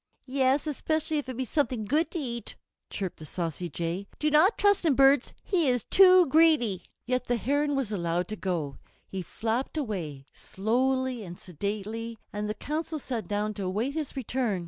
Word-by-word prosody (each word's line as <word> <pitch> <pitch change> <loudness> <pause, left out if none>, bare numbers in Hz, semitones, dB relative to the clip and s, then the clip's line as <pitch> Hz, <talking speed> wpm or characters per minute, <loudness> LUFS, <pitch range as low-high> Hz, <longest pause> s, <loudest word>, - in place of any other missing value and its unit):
"Yes, 265 +2 +2
especially 315 +1 -1
if 265 - -6
it 255 - -5
be 260 - -1
something 250 -5 0
good 305 +9 +1
to - - -5
eat," 235 -7 -5 0.3
chirped 190 -3 -4
the 155 - -10
saucy 170 +1 -3
Jay, 170 +5 -3
"do 305 0 +1
not 320 +9 +5
trust 405 -2 +3
him, 310 -5 +3
birds, 270 0 +5
he 345 -6 +1
is 245 -3 +2
too 370 -2 +7
greedy." 285 - +4 0.2
Yet 250 0 0
the 245 - +1
Heron 285 +5 +1
was 265 -6 -1
allowed 175 -2 -1
to 215 - -3
go. 170 -9 -3 0.3
He 190 - -4
flapped 230 - -2
away, 170 - -4
slowly 255 +3 0
and 175 -2 -9
sedately, 210 +6 -4 0.2
and 210 0 -3
the 215 - -2
Council 315 +4 -3
sat 240 - -4
down 210 +2 -1
to 205 - -5
await 215 +9 -1
his 305 -3 -3
return. 245 -6 -1
245 Hz, 180 wpm, -28 LUFS, 200-290 Hz, 0.3 s, too